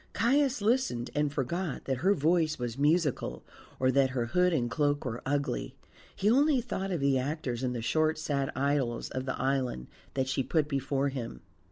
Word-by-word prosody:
Caius 260 +1 +2
listened, 220 - +1
and 150 -1 +1
forgot 150 +4 -3
that 135 -1 -1
her 190 +9 +3
voice 160 +1 +2
was 120 -2 -3
musical 150 +1 +1 0.4
or 130 0 +3
that 135 0 +3
her 125 -2 -1
hood 180 +8 +2
and 125 -8 +1
cloak 145 +3 0
were 120 -2 -3
ugly; 140 0 -1 0.4
he 195 - -1
only 275 +4 +4
thought 210 -5 -3
of 175 -4 -1
the 140 -1 +3
actors 130 -3 -3
in 125 -1 -1
the 120 -2 -4
short 155 +5 +2
sad 145 -3 -1
idylls 135 -3 0
of 130 +1 -4
the 130 - -2
island 130 - -1 0.3
that 130 -1 0
she 135 0 0
put 150 +3 +1
before 140 -1 0
him. 130 -4 -6
140 Hz, 185 wpm, -30 LUFS, 130-170 Hz, 0.4 s, only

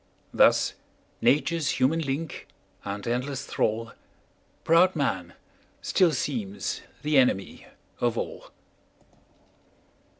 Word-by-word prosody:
Thus - - +4 0.5
nature's 155 +1 +2
human 145 +6 +3
link 145 +1 -4 0.4
and 100 0 -5
endless 130 +3 -2
thrall, 115 +1 -1 0.7
Proud 175 +3 +5
man, 95 - -2 0.5
still 180 -3 +3
seems 120 -8 -3 0.2
the 150 -2 +4
enemy 110 -7 0 0.3
of 120 -1 0
all. - - -5
135 Hz, 90 wpm, -26 LUFS, 115-155 Hz, 0.7 s, Proud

